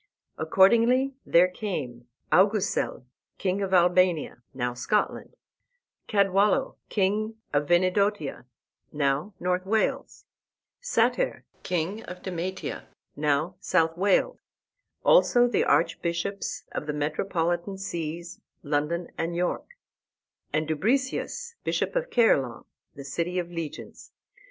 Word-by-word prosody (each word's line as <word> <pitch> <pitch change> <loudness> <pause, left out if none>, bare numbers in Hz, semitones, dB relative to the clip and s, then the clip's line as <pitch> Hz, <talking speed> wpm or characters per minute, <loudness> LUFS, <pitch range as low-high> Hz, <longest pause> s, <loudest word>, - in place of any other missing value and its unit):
Accordingly 235 +11 +4
there 175 +2 +6
came 145 - -5 0.2
Augusel, 200 - +2 0.3
king 190 +1 -1
of 195 -1 -2
Albania, 180 -6 +3
now 125 -1 -2
Scotland, 165 - -1 0.7
Cadwallo, 200 0 +2
king 215 +2 0 0.2
of 145 0 +1
Venedotia, 185 -4 +1 0.5
now 145 +6 -1
North 180 0 0
Wales, 215 +3 -1 0.6
Sater, - - +1 0.2
king 180 +5 -2
of 180 0 -9
Demetia, 185 0 -4 0.3
now 150 +4 0
South 165 -4 +1
Wales; 200 - +2 0.7
also 245 - +5
the 240 - +1
archbishops 170 +4 0
of 150 - -5
the 150 - -1
metropolitan 170 +4 -1
sees, 170 -2 -5 0.2
London 150 +4 -1
and 165 +1 -2
York, 175 +1 -1 0.8
and 155 0 0
Dubricius, 260 - -1
bishop - - -1
of - - -1
Caerleon, 135 - +2 0.3
the 140 - -9
City 170 +6 -2
of 175 -1 -2
Legions. 165 -3 -7
180 Hz, 105 wpm, -26 LUFS, 160-200 Hz, 0.8 s, there